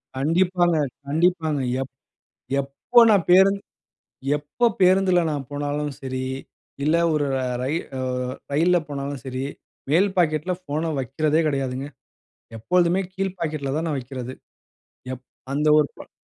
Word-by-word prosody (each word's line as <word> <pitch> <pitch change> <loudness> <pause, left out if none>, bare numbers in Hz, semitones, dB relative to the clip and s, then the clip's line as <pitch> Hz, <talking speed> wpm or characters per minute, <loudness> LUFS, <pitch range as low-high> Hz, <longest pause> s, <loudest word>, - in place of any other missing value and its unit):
கண்டிப்பாங்க, 175 +4 +2 0.3
கண்டிப்பாங்க. 160 -1 +1 0.2
எப் 135 0 -6 0.7
எப்போ 140 - +3
நான் 200 -5 +3
பேருந் 190 +2 +6 0.8
எப்போ 145 +11 -1 0.2
பேருந்துல 185 -1 +5
நான் 145 -2 -3
போனாலும் 145 +1 -2
சரி, 130 -1 -3 0.6
இல்ல 155 +3 +3 0.2
ஒரு 150 -1 +1
ர - - 0 0.2
ரயி 140 +5 0 0.2
அ - - -3 0.5
ரயில்ல 170 +5 +4
போனாலும் 140 -1 -4
சரி. 130 0 -3 0.5
மேல் 185 +6 +4
பாக்கெட்ல 155 0 +2
ஃபோன 155 0 -2
வக்கிறதே 150 +5 +1
கெடையாதுங்க. 135 -2 -2 0.7
எப்பொழுதுமே 180 - +2
கீழ்ப் 190 -1 -3
பாக்கெட்ல 150 -4 -2
தான் 165 - -2
நான் 150 -3 -1
வைக்கிறது. 130 0 -6 0.8
எப் 130 0 -8 0.3
அந்த 150 +2 0
ஒரு 150 - +4
ப - - -12
150 Hz, 125 wpm, -23 LUFS, 140-180 Hz, 0.8 s, பேருந்